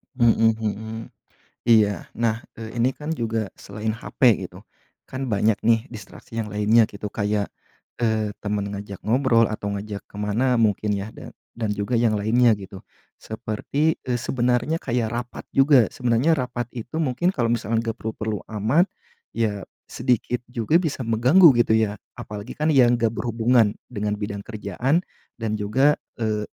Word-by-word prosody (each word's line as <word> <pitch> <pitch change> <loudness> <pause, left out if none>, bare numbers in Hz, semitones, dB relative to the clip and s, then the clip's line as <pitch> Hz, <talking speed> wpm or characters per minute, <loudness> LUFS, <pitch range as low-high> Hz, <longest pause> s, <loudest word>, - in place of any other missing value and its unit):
Mhm 115 -2 +4
mhm. 110 +1 -3 0.7
Iya, 105 -5 +4
nah, 115 0 -1
eee, 115 +1 -8
ini 125 +3 +2
kan 150 +3 -7
juga 115 -3 -2
selain 105 +2 -5
HP 120 -1 +2
gitu, - - -12 0.5
kan 130 +1 -4
banyak 110 -2 +2
nih 115 +3 +3
distraksi 115 0 -10
yang 110 -2 -2
lainnya 105 +2 +4
gitu 105 0 -7
kayak, 105 -1 -1 0.5
eee, 110 -2 0
temen 105 -1 -2
ngajak 100 -1 -7
ngobrol 115 0 +3
atau 105 -1 -3
ngajak 100 0 -6
ke - - -19
mana 115 +5 +1
mungkin 105 -1 +1
ya, 100 +1 -3
dan - - -11 0.2
dan 110 -3 -1
juga 105 +4 -1
yang 115 -2 +3
lainnya 110 +3 +3
gitu. 95 -2 -9 0.3
Seperti, 125 +9 -2
eee, 125 -1 0
sebenarnya 125 +5 +1
kayak 120 -7 -1
rapat 120 +1 -5
juga, 135 -4 +5
sebenarnya 125 +6 +1
rapat 125 -2 -3
itu 120 +5 -7
mungkin 160 +6 +1
kalau 120 -7 0
misalkan 115 -1 0
gak 115 0 -4
perlu-perlu 110 -1 -3 0.2
amat, 140 - +4 0.5
ya 105 -3 -1 0.2
sedikit 125 -1 0
juga 125 +5 +1
bisa 160 -6 -2
mengganggu 125 +10 +6
gitu 120 -2 +3
ya. 110 -2 +1 0.2
Apalagi 105 +2 -7
kan 155 +1 0
yang 120 -5 +4
gak 115 -1 +2
berhubungan 115 -2 +2 0.2
dengan 105 0 -2
bidang 105 -1 -5
kerjaan, 115 - -1 0.4
dan 110 -1 -1
juga, 130 +8 +2 0.2
eee, 105 -1 0
115 Hz, 155 wpm, -23 LUFS, 105-125 Hz, 0.7 s, mengganggu